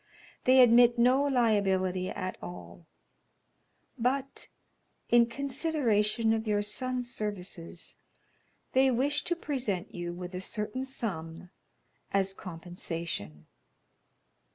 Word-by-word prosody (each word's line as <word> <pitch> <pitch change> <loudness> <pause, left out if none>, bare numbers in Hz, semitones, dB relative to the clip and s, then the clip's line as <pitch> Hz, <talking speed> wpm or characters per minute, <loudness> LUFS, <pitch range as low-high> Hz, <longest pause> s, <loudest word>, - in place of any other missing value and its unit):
"They 260 0 +7
admit 240 0 +6
no 250 +3 +4
liability 195 -7 +1
at 185 -2 -4
all, 175 -1 -10 1.1
but 265 +3 -1 0.6
in 235 -1 +6
consideration 240 -5 +1
of 220 0 -2
your 205 -1 +1
son's 250 +3 -2
services, 185 -6 -5 0.8
they 265 +1 +5
wish 280 +4 +1
to 345 - 0
present 245 - -3
you 175 -1 -4
with 180 +1 -7
a 180 - -4
certain 210 +6 -3
sum 175 -9 -5 0.6
as 195 -1 +1
compensation." 165 - -6
215 Hz, 100 wpm, -30 LUFS, 185-255 Hz, 1.1 s, They